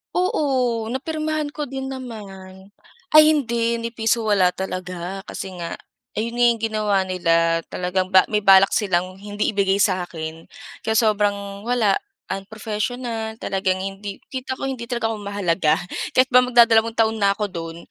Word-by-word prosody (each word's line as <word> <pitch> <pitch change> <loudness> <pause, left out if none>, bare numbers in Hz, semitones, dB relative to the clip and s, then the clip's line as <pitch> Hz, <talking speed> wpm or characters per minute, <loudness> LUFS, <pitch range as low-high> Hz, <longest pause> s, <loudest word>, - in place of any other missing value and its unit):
Oo, 255 -10 0
napirmahan 310 +2 -2
ko 295 -3 -4
din 265 0 -5
naman. 200 -7 -9 0.4
Ay 310 0 +9
hindi, 235 -5 +1
ni 230 0 -5
piso 225 0 0
wala 195 -4 +4
talaga 185 0 -5
kasi 190 -1 -7
nga 170 -1 -5 0.4
ayon 230 +2 -2
na 245 0 +1
yung 230 -1 -1
ginawa 215 -2 0
nila, 165 -2 +2
talagang 185 +1 -1
ba 190 -1 +6
may 210 -1 0
balak 195 -1 +6
silang 185 -2 0
hindi 205 +1 -2
ibigay 195 -1 +2
sa'kin. 170 -5 -2 0.3
Kaya 220 0 -1
sobrang 205 -2 +1
wala, 230 -4 +2 0.3
unprofessional, 220 +3 -4
talagang 190 -2 -1
hindi 195 +1 -6 0.2
kita 260 0 -4
ko - - -4
hindi 255 -3 -5
talaga 230 -2 -1
ako 215 - -5
mahalaga. 190 -5 +1 0.4
Kahit 260 +1 +5
ba 250 - +8
magdadalawang 230 -2 +4
taon 225 0 +2
na 200 - +4
ako 210 - -1
do'n. 165 -3 -6
210 Hz, 150 wpm, -22 LUFS, 190-235 Hz, 0.4 s, Ay